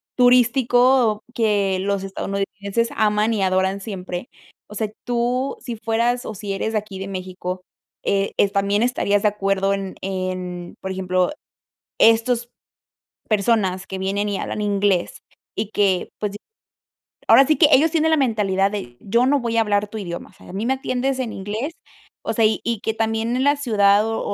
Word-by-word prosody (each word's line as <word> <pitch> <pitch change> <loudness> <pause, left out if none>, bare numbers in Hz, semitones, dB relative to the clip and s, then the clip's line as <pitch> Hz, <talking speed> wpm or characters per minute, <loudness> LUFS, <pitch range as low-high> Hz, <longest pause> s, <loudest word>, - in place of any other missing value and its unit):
turístico 245 -2 +4
que 205 -5 +1
los 200 0 -1
estadounidenses 200 +3 -2
aman 210 +1 +2
y 210 - -1
adoran 190 +1 +1
siempre. 185 -1 -6 0.4
O 210 - -11
sea, 215 0 -2
tú, 245 +2 -1
si 240 - -6
fueras, 230 +2 0
o 220 - -5
si 200 -1 -4
eres 220 +3 -2
de - - +2
aquí 205 -2 -5
de 195 - -5
México, 185 -1 -5 0.4
eh, 195 0 0
¿es 200 - +3
también 200 +1 +1
estarías 205 -4 +1
de 210 - +5
acuerdo 195 -1 0
en 195 -1 -4
en? 185 -2 -4
Por 190 - -5
ejemplo, 185 +1 0 0.7
estos 235 +1 +3 0.8
personas 200 -3 +1
que 190 - -5
vienen 200 +2 -1
y 195 - -2
hablan 210 - -3
inglés, 200 -3 0 0.3
y 215 -1 -2
que, 195 -4 +1
pues, 205 -1 -3 0.9
ahora 270 - +7
sí 310 +1 +3
que 300 - +6
ellos 315 +5 +6
tienen 320 0 +2
la 315 - +4
mentalidad 205 -7 +1
de: 120 -13 -6
"Yo 235 +5 +2
no 285 +2 +3
voy 235 -1 -2
a - - +5
hablar 210 -1 +1
tu 220 - -8
idioma", 175 -4 -6
o - - -24
sea, - - -17
"a - - -9
mí 205 +5 -3
me 265 - +2
atiendes 265 0 -1
en 240 -4 -3
inglés", 215 +10 -4 0.5
o - - -1
sea, 225 0 +2
y 215 0 +2
y 230 -3 -1
que 220 - -2
también 225 +2 -1
en 260 - +1
la 285 +1 +4
ciudad, 210 -6 +3
o 225 - -2
210 Hz, 180 wpm, -21 LUFS, 195-235 Hz, 0.9 s, ahora